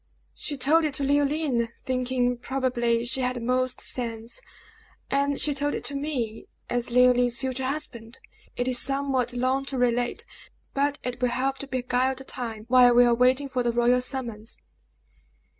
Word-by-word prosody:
"She 290 - -4
told 300 +6 +4
it 300 -3 0
to 280 - -2
Leoline, 285 -3 +1 0.2
thinking, 255 -1 0
probably, 240 -2 0
she 260 +2 -1
had 250 0 0
the - - -4
most 255 +2 0
sense; 230 - -3 0.7
and 280 0 +1
she 295 - +2
told 290 +1 -1
it - - -5
to 285 - -1
me, 260 -7 -3 0.2
as 245 0 0
Leoline's 245 0 +4
future 265 0 -3
husband. 240 -5 -5 0.4
It 245 - -1
is 250 -1 +3
somewhat 270 -2 0
long 255 +2 0
to 275 -1 -3
relate, 245 - 0 0.5
but 285 +1 +1
it 250 0 -4
will 250 - +2
help 265 +2 -1
to 280 - -5
beguile 255 0 0
the 265 - -8
time 230 -5 -5
while 245 -1 +6
we 245 0 +7
are 240 - +4
waiting 255 +4 +3
for 255 -2 -1
the 240 -1 +1
royal 240 +1 +3
summons." 235 -4 -5
255 Hz, 170 wpm, -26 LUFS, 245-270 Hz, 0.7 s, we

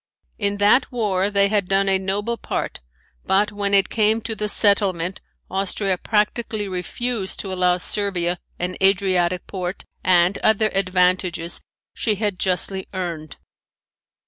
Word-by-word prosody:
In 200 -1 0
that 205 +6 +3
war 205 -5 0
they 200 -1 +3
had 205 -3 +1
done 195 +1 +2
a 190 -1 +3
noble 205 +5 -1
part - - -4 0.4
but 205 +2 +2
when 200 -1 0
it 195 -1 +4
came 220 0 +2
to 225 0 -3
the 210 0 -2
settlement 195 -4 +2 0.3
Austria 195 0 -1
practically 215 0 -1
refused 195 +3 -2
to 190 -2 -5
allow 180 -1 +2
Servia 180 -2 0 0.2
an 180 +1 -3
Adriatic 185 -2 +2
port 185 -1 -5 0.2
and 180 +1 +3
other 220 0 +2
advantages 180 -3 +1 0.3
she 215 -3 0
had 205 -2 -2
justly 190 +1 0
earned. 170 -4 -5
195 Hz, 135 wpm, -21 LUFS, 185-210 Hz, 0.4 s, it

